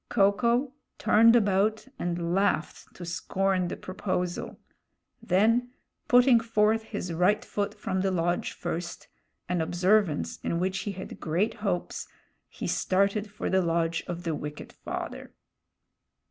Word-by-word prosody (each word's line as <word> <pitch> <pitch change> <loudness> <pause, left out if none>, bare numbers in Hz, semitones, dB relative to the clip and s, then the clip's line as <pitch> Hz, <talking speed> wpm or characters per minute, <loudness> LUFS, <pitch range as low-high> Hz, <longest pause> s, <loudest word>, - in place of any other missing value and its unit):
Ko 195 0 +4
ko 240 +6 +1 0.2
turned 225 +2 +5
about 215 +1 +2
and 170 -1 -2
laughed 195 -4 0
to 175 - -8
scorn 185 +2 0
the - - -5
proposal. 185 -2 -3 0.6
Then 230 +7 +2 0.3
putting 245 -1 +6
forth 220 -1 +1
his 185 -6 -4
right 180 +6 +2
foot 205 -1 -2
from 185 0 -1
the 195 - +1
lodge 175 -1 0
first, 170 +1 -5 0.4
an 175 -1 0
observance 175 - +1
in 170 - -1
which 190 +1 -1
he - - -3
had 185 - -8
great 175 +8 0
hopes, 195 -4 -3 0.4
he - - -7
started 200 +2 +1
for 205 - -5
the 190 0 +3
lodge 165 -1 0
of 175 0 -5
the 165 -2 -1
wicked 150 0 -7
father. - - -6
190 Hz, 135 wpm, -28 LUFS, 175-215 Hz, 0.6 s, putting